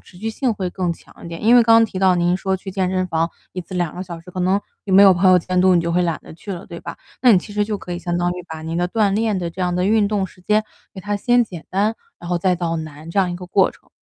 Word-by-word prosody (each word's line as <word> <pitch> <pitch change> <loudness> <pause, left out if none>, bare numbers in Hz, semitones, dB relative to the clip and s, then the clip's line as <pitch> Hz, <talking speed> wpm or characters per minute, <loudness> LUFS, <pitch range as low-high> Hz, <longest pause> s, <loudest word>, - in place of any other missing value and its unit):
持 - - -19
续 220 +4 -3
性 245 +2 -1
会 195 -3 -3
更 180 -2 -1
强 - - -16
一 - - -7
点。 165 0 -8
因 225 +3 +5
为 240 - +7
刚 225 0 +5
刚 225 - +6
提 200 -4 -5
到 190 -1 +4
您 175 +1 +2
说 190 0 -1
去 190 +1 -8
健 185 -1 -1
身 185 0 0
房 165 -1 -1 0.2
一 185 - -4
次 185 +2 -10
2 175 -4 -1
个 180 - -5
小 170 -3 -8
时， 165 - -14
可 185 - -5
能 190 +3 +2 0.2
你 195 - -3
没 195 +1 +8
有 195 -1 +8
朋 185 +2 +4
友 180 - +6
监 180 +1 -2
督， 185 0 +5
你 175 - +4
就 170 0 -2
会 180 +1 +2
懒 170 -2 -1
得 - - -12
去 195 +5 -7
了， 175 - -8
对 170 -2 -8
吧？ - - -8 0.3
那 250 -2 +7
你 195 - +6
其 205 - -9
实 210 0 +1
就 210 0 -3
可 180 - -7
以 175 - -3
相 175 -1 -2
当 175 0 +1
于 180 0 -6
把 160 -2 -7
您 165 +1 -4
的 175 +1 +1
锻 205 0 +1
炼 215 -1 0
的 175 -2 -3
这 185 - -9
样 180 -1 0
的 180 +1 0
运 210 0 +3
动 200 -2 -1
时 185 - -19
间 215 +2 +2 0.3
给 190 - -9
它 205 +2 -2
先 245 +4 +3
简 175 -7 -8
单， 205 +4 +1 0.2
然 170 - -9
后 175 - +1
再 185 +1 +2
到 170 -1 -2
难 155 0 -8
这 185 - -1
样 185 -2 +2
一 175 - -4
个 180 0 -9
过 190 +1 +3
程。 - - -23
185 Hz, 350 characters per minute, -20 LUFS, 175-200 Hz, 0.3 s, 没